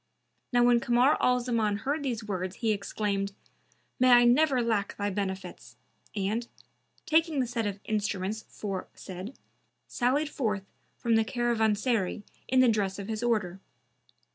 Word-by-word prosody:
Now 245 Hz, -1 st, +4 dB
when 240 Hz, 0 st, +5 dB
Kamar 245 Hz, +4 st, +3 dB
al 250 Hz, 0 st, +3 dB
Zaman 225 Hz, -4 st, 0 dB
heard 285 Hz, +6 st, -1 dB
these 240 Hz, -5 st, -2 dB
words 190 Hz, -3 st, -3 dB
he 225 Hz, -2 st, 0 dB
exclaimed, 200 Hz, -1 st, -2 dB, 0.7 s
"May 255 Hz, 0 st, +5 dB
I 240 Hz, -1 st, +8 dB
never 260 Hz, +2 st, +4 dB
lack 220 Hz, -4 st, 0 dB
thy 205 Hz, 0 st, -1 dB
benefits!", 190 Hz, -1 st, -5 dB, 0.4 s
and, 215 Hz, +4 st, -1 dB, 0.6 s
taking 320 Hz, -1 st, +2 dB
the 255 Hz, -, +2 dB
set 230 Hz, -2 st, -2 dB
of 200 Hz, -1 st, -4 dB
instruments 210 Hz, -1 st, -2 dB
aforesaid, 195 Hz, +1 st, -7 dB, 0.5 s
sallied 275 Hz, +5 st, +1 dB
forth 215 Hz, -9 st, -2 dB, 0.3 s
from 230 Hz, -1 st, +2 dB
the 225 Hz, -, +3 dB
caravanserai 220 Hz, -3 st, 0 dB, 0.2 s
in 260 Hz, 0 st, +4 dB
the 255 Hz, -, +5 dB
dress 205 Hz, -4 st, +1 dB
of 200 Hz, +1 st, -7 dB
his 220 Hz, 0 st, -3 dB
order. 210 Hz, -6 st, 0 dB
225 Hz, 140 wpm, -28 LUFS, 200-245 Hz, 0.7 s, I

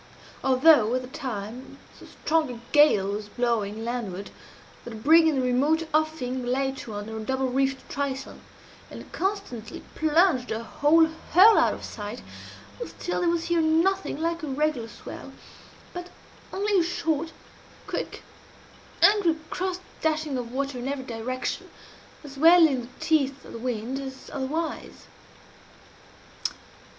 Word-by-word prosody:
Although, 260 Hz, -3 st, +5 dB
at 255 Hz, -, -1 dB
the -, -, -8 dB
time, 240 Hz, -1 st, -6 dB, 0.2 s
so -, -, -13 dB
strong 315 Hz, -2 st, 0 dB
a 235 Hz, -, -8 dB
gale 250 Hz, -10 st, +5 dB
was 210 Hz, 0 st, -5 dB
blowing 225 Hz, -2 st, -1 dB
landward 205 Hz, -6 st, -4 dB, 0.5 s
that 240 Hz, -, -8 dB
a -, -, -7 dB
brig 320 Hz, +9 st, +5 dB
in 310 Hz, -, +2 dB
the 265 Hz, -, +1 dB
remote 290 Hz, +6 st, +2 dB
offing 300 Hz, -5 st, 0 dB
lay 265 Hz, +2 st, 0 dB
to 220 Hz, -5 st, -7 dB
under 210 Hz, +2 st, -6 dB
a -, -, -4 dB
double 265 Hz, +4 st, -1 dB
reefed 270 Hz, +1 st, 0 dB
trysail, 275 Hz, -1 st, -4 dB, 0.5 s
and -, -, -11 dB
constantly 330 Hz, -, -4 dB
plunged 315 Hz, -4 st, +3 dB
her 225 Hz, +1 st, -3 dB
whole 315 Hz, +6 st, +4 dB, 0.3 s
hull 405 Hz, +6 st, +9 dB
out -, -, +3 dB
of -, -, -11 dB
sight, 210 Hz, +2 st, -7 dB, 0.6 s
still 355 Hz, -, -4 dB
there 350 Hz, -, +2 dB
was 335 Hz, -1 st, 0 dB
here 340 Hz, -1 st, +1 dB
nothing 330 Hz, +2 st, +1 dB
like 335 Hz, +1 st, -1 dB
a 310 Hz, -, -4 dB
regular 280 Hz, -4 st, -1 dB
swell, -, -, -10 dB, 0.6 s
but 355 Hz, 0 st, -7 dB, 0.4 s
only 400 Hz, 0 st, +1 dB
a -, -, +3 dB
short, 325 Hz, -2 st, -1 dB, 0.5 s
quick, -, -, -5 dB, 0.8 s
angry 400 Hz, -6 st, +5 dB
cross 370 Hz, 0 st, -2 dB, 0.2 s
dashing 310 Hz, -2 st, 0 dB
of 245 Hz, -2 st, -4 dB
water 275 Hz, 0 st, -2 dB
in 245 Hz, -, -4 dB
every 275 Hz, -1 st, -3 dB
direction 245 Hz, +2 st, -4 dB, 0.5 s
as 275 Hz, -2 st, -10 dB
well 335 Hz, +2 st, +8 dB
in 270 Hz, -5 st, +1 dB
the 240 Hz, -, -10 dB
teeth 280 Hz, -4 st, +1 dB
of -, -, -11 dB
the 230 Hz, -, -6 dB
wind 245 Hz, +2 st, -3 dB
as 265 Hz, -1 st, -8 dB
otherwise. 295 Hz, +4 st, -4 dB
275 Hz, 145 wpm, -26 LUFS, 245-320 Hz, 0.8 s, hull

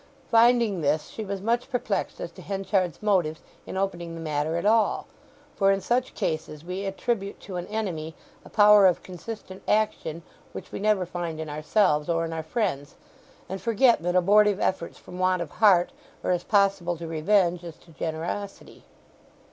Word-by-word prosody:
Finding 230 Hz, -4 st, +4 dB
this, 150 Hz, +1 st, 0 dB
she 220 Hz, -, -6 dB
was 200 Hz, -1 st, -5 dB
much 235 Hz, +4 st, 0 dB
perplexed 250 Hz, -, -2 dB
as -, -, -5 dB
to -, -, -13 dB
Henchard's 195 Hz, -2 st, -1 dB
motives 175 Hz, -7 st, +1 dB, 0.2 s
in -, -, -5 dB
opening 175 Hz, -3 st, -3 dB
the -, -, -7 dB
matter 155 Hz, 0 st, -1 dB
at 170 Hz, -, -3 dB
all; 220 Hz, +1 st, +3 dB, 0.5 s
for 195 Hz, -1 st, +4 dB
in 195 Hz, -, +1 dB
such 245 Hz, +6 st, -1 dB
cases 155 Hz, -1 st, -3 dB
we 185 Hz, +3 st, -4 dB
attribute 200 Hz, +1 st, -2 dB
to 190 Hz, -, -8 dB
an 175 Hz, -, -5 dB
enemy 175 Hz, -8 st, -4 dB, 0.3 s
a -, -, -14 dB
power 210 Hz, -2 st, +7 dB
of 180 Hz, -, +1 dB
consistent 190 Hz, +1 st, -8 dB
action 170 Hz, -6 st, 0 dB, 0.3 s
which -, -, -8 dB
we -, -, -5 dB
never 205 Hz, -2 st, +2 dB
find 170 Hz, -2 st, -5 dB
in 155 Hz, -1 st, -5 dB
ourselves 150 Hz, 0 st, +1 dB
or 165 Hz, 0 st, +1 dB
in 165 Hz, -, -5 dB
our 160 Hz, -, -3 dB
friends; 155 Hz, -, -2 dB, 0.5 s
and 190 Hz, +1 st, -5 dB
forget 235 Hz, 0 st, +3 dB
that 175 Hz, +1 st, -1 dB
abortive 205 Hz, +2 st, +4 dB
efforts 175 Hz, -3 st, -1 dB
from 180 Hz, -, -11 dB
want 185 Hz, 0 st, +2 dB
of 170 Hz, -4 st, -5 dB
heart 190 Hz, -5 st, +4 dB, 0.3 s
are -, -, 0 dB
as 175 Hz, -1 st, 0 dB
possible 195 Hz, -4 st, +2 dB
to 170 Hz, -, -7 dB
revenge 175 Hz, +2 st, +2 dB
as 170 Hz, -2 st, -8 dB
to 170 Hz, -, -20 dB
generosity. 165 Hz, +6 st, -5 dB
185 Hz, 175 wpm, -26 LUFS, 165-210 Hz, 0.5 s, power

